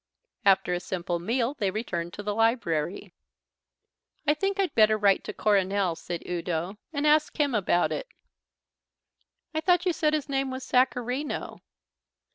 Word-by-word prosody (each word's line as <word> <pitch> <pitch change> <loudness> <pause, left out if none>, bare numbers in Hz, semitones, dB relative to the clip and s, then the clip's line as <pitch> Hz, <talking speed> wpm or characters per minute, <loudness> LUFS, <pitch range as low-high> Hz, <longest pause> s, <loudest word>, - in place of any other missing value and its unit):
After 190 -2 +4
a 175 - 0
simple 175 -1 -3
meal 235 +8 0
they 205 -9 -1
returned 175 -5 -3
to 205 - -7
the 205 0 -1
library. 205 -7 0 1.1
"I 295 - +4
think 390 +5 -2
I'd 385 -2 +1
better 215 -1 +5
write 200 -2 +3
to - - -4
Coronel," 195 -3 +1
said 170 0 -6
Udo, 175 +3 -3
"and 290 -1 -2
ask 305 +1 +3
him 285 -3 +2
about 180 -4 +2
it." - - -3 1.5
"I 315 - -1
thought 360 +1 +3
you 360 - +2
said 310 -2 +1
his 295 -2 -3
name 270 -1 -1
was 260 0 -5
Sacharino." 255 +2 0
220 Hz, 150 wpm, -27 LUFS, 185-290 Hz, 1.5 s, better